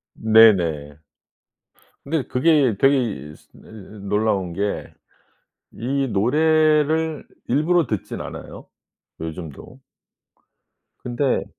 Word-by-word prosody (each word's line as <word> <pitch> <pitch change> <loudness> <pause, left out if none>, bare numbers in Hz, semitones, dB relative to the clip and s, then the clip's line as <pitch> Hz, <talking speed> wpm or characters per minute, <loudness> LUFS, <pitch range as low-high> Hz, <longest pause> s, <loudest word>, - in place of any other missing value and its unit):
네네. 90 -10 +4 1.1
근데 150 -1 -1
그게 135 -4 +2
되게 135 +1 +4 0.3
이 75 - -12
스 - - -24
이 - - -16 0.5
놀라운 100 -4 0
게 100 +2 -3 0.8
이 135 +4 -2
노래를 155 +6 +2 0.2
일부러 155 +3 +2
듣진 105 -7 -4
않아요, - - -9 0.5
요즘도. 80 - -9 1.2
근데 125 +2 -1
125 Hz, 165 characters per minute, -21 LUFS, 100-150 Hz, 1.2 s, 네네